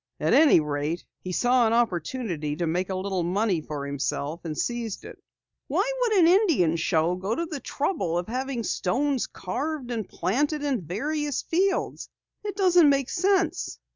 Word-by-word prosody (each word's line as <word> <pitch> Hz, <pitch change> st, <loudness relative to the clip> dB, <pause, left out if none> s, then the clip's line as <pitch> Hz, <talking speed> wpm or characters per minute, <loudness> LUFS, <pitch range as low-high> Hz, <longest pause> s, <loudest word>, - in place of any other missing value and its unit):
At -, -, +1 dB
any 305 Hz, -, +7 dB
rate, 150 Hz, +2 st, -2 dB
he 185 Hz, -, -6 dB
saw 245 Hz, +4 st, +3 dB
an 220 Hz, -, +1 dB
opportunity 180 Hz, -, -1 dB
to 170 Hz, +2 st, -2 dB
make 180 Hz, +3 st, -1 dB
a 190 Hz, -, -2 dB
little 190 Hz, -1 st, -2 dB
money 185 Hz, 0 st, 0 dB
for 150 Hz, -2 st, -5 dB
himself 140 Hz, +3 st, -3 dB
and 155 Hz, -3 st, -5 dB
seized 235 Hz, -4 st, -3 dB
it." -, -, -11 dB, 0.5 s
"Why -, -, +1 dB, 0.3 s
should 430 Hz, -, +2 dB
an 330 Hz, -, +6 dB
Indian 335 Hz, -, +4 dB
show 165 Hz, +1 st, +1 dB
go 195 Hz, +5 st, -2 dB
to 335 Hz, -, -2 dB
the 315 Hz, -4 st, -5 dB
trouble 270 Hz, -, -1 dB
of 175 Hz, -, -2 dB
having 255 Hz, +1 st, -3 dB
stones 260 Hz, +8 st, 0 dB
carved 265 Hz, +7 st, -4 dB
and 220 Hz, -5 st, -3 dB
planted 290 Hz, -, -1 dB
in 275 Hz, -7 st, 0 dB
various 290 Hz, -, -2 dB
fields? 385 Hz, +4 st, 0 dB, 0.3 s
It 410 Hz, -1 st, -4 dB
doesn't 360 Hz, -5 st, +5 dB
make 275 Hz, -2 st, +1 dB
sense." 370 Hz, -2 st, +1 dB
230 Hz, 170 wpm, -26 LUFS, -, 0.5 s, any